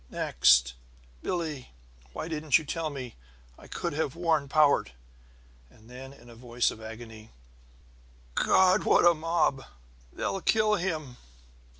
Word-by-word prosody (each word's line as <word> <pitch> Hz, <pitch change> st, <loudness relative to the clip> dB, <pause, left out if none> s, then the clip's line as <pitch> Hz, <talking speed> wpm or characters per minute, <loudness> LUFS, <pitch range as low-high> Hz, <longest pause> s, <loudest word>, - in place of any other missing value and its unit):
Next: -, -, +3 dB, 0.5 s
"Billie: 155 Hz, -, -4 dB, 0.4 s
Why 155 Hz, -, -6 dB
didn't 155 Hz, -3 st, +2 dB
you 160 Hz, -, -7 dB
tell 160 Hz, +2 st, -3 dB
me? 130 Hz, -5 st, -8 dB, 0.4 s
I -, -, -16 dB
could 170 Hz, -3 st, -4 dB
have 145 Hz, -3 st, -2 dB
warned 160 Hz, -5 st, 0 dB
Powart!" 145 Hz, -, +3 dB, 0.8 s
And 110 Hz, -, -20 dB
then, 130 Hz, +2 st, -10 dB
in 120 Hz, -3 st, -17 dB
a 120 Hz, -, -13 dB
voice 120 Hz, +1 st, -1 dB
of 110 Hz, -, -11 dB
agony: 110 Hz, 0 st, -10 dB, 1.0 s
"God, 190 Hz, -, +3 dB
what -, -, +4 dB
a 175 Hz, -, +7 dB
mob! 160 Hz, -4 st, 0 dB, 0.5 s
They'll 195 Hz, -, -3 dB
kill 215 Hz, +1 st, +2 dB
him!" 160 Hz, -10 st, -3 dB
145 Hz, 130 wpm, -28 LUFS, 120-165 Hz, 1.0 s, a